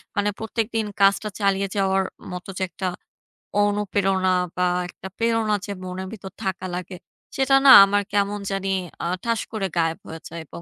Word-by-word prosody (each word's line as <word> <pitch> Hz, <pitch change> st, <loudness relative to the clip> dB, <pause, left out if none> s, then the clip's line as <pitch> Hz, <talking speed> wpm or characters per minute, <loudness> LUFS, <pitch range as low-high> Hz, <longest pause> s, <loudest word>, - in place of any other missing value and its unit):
মানে 205 Hz, 0 st, +1 dB
প্রত্যেকদিন 225 Hz, 0 st, -2 dB
কাজটা 200 Hz, +2 st, +3 dB
চালিয়ে 195 Hz, -1 st, +1 dB
যাওয়ার 195 Hz, -1 st, +2 dB, 0.3 s
মত 180 Hz, 0 st, -6 dB
যে 190 Hz, -, -1 dB
একটা 185 Hz, +1 st, -4 dB, 0.8 s
অনুপ্রেরণা 195 Hz, -2 st, +1 dB, 0.2 s
বা, 180 Hz, 0 st, +1 dB, 0.2 s
একটা 190 Hz, -, -10 dB
প্রেরণা 225 Hz, -2 st, +1 dB
যে 205 Hz, -, -6 dB
মনের 185 Hz, +1 st, -5 dB
ভিতর 190 Hz, -3 st, -9 dB
থাকা 190 Hz, -1 st, -3 dB
লাগে, 180 Hz, +1 st, -6 dB, 0.4 s
সেটা 270 Hz, 0 st, +3 dB
না 265 Hz, -, +10 dB
আমার 205 Hz, +1 st, +1 dB
কেমন 205 Hz, 0 st, +1 dB
জানি 195 Hz, 0 st, -2 dB, 0.3 s
আ -, -, -1 dB, 0.2 s
ঠাস 230 Hz, -1 st, 0 dB
করে 205 Hz, -4 st, -2 dB
গায়েব 165 Hz, -1 st, +1 dB
হয়ে 160 Hz, 0 st, -8 dB
যায় 170 Hz, 0 st, -7 dB
এবং 170 Hz, -, -10 dB
195 Hz, 165 wpm, -23 LUFS, 185-210 Hz, 0.8 s, না